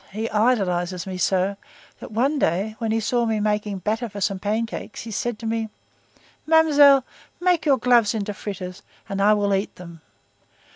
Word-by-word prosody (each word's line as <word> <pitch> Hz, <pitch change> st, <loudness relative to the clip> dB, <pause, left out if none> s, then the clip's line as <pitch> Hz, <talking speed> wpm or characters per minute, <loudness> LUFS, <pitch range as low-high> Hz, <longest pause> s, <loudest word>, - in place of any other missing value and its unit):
He 220 Hz, +3 st, -3 dB
idolizes 185 Hz, -6 st, +1 dB
me 185 Hz, -1 st, -6 dB
so, 190 Hz, +2 st, +1 dB, 0.4 s
that -, -, -10 dB
one 270 Hz, +7 st, +1 dB
day 195 Hz, +4 st, 0 dB
when 225 Hz, -2 st, -1 dB
he 225 Hz, -, +1 dB
saw 235 Hz, +2 st, 0 dB
me 220 Hz, -1 st, 0 dB
making 210 Hz, -1 st, -1 dB
batter 220 Hz, +5 st, -2 dB
for 205 Hz, 0 st, -8 dB
some 195 Hz, -1 st, -1 dB
pancakes, 220 Hz, +2 st, -3 dB
he 225 Hz, -, -8 dB
said 235 Hz, +2 st, -2 dB
to 230 Hz, -, -9 dB
me: 225 Hz, 0 st, -2 dB, 0.8 s
_'Mamselle, 290 Hz, -4 st, +6 dB, 0.4 s
make 355 Hz, -3 st, +1 dB
your 275 Hz, -2 st, +5 dB
gloves 235 Hz, -3 st, +3 dB
into 205 Hz, -1 st, -3 dB
fritters, 185 Hz, -3 st, -7 dB, 0.3 s
and 195 Hz, 0 st, -3 dB
I 210 Hz, +1 st, +5 dB
will 200 Hz, -1 st, +1 dB
eat 195 Hz, +1 st, -1 dB
them. 170 Hz, -2 st, -12 dB
215 Hz, 175 wpm, -23 LUFS, 195-235 Hz, 0.8 s, Mamselle